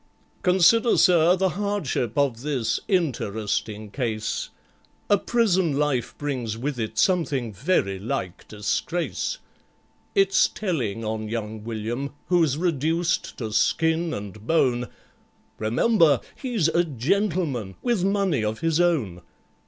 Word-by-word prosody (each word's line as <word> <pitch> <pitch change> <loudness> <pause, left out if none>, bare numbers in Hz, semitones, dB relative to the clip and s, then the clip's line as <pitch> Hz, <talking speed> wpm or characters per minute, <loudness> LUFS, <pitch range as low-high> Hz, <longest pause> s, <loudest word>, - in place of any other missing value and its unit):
"Consider, 190 +6 +4
sir, 175 -1 +5
the 190 0 +1
hardship 180 - -2
of 135 -5 +1
this 135 -5 -1
interesting 110 - -1
case: 110 -3 -2 0.6
A 205 - +7
prison 190 -12 +1
life 145 -5 -1
brings 125 -7 -3
with 130 +2 -3
it 110 0 -4
something 140 - +1
very 100 - 0
like 95 -3 -4
disgrace; 110 +11 -2 0.8
It's 390 -1 +4
telling 120 - -3
on 110 0 -3
young 110 -1 -4
WILLIAM, 115 +5 -4
who's 165 -6 +3
reduced 165 +1 0
to 110 -3 -4
skin 160 +8 +2
and 105 -2 -7
bone— 125 -7 +2 0.7
Remember 145 - +3 0.2
he's 240 - 0
a 170 +1 +2
gentleman, 150 - -1
with 235 -7 +1
money 195 - +1
of 110 +4 -2
his 165 -1 +1
own. 125 - 0
145 Hz, 115 wpm, -24 LUFS, 110-175 Hz, 0.8 s, A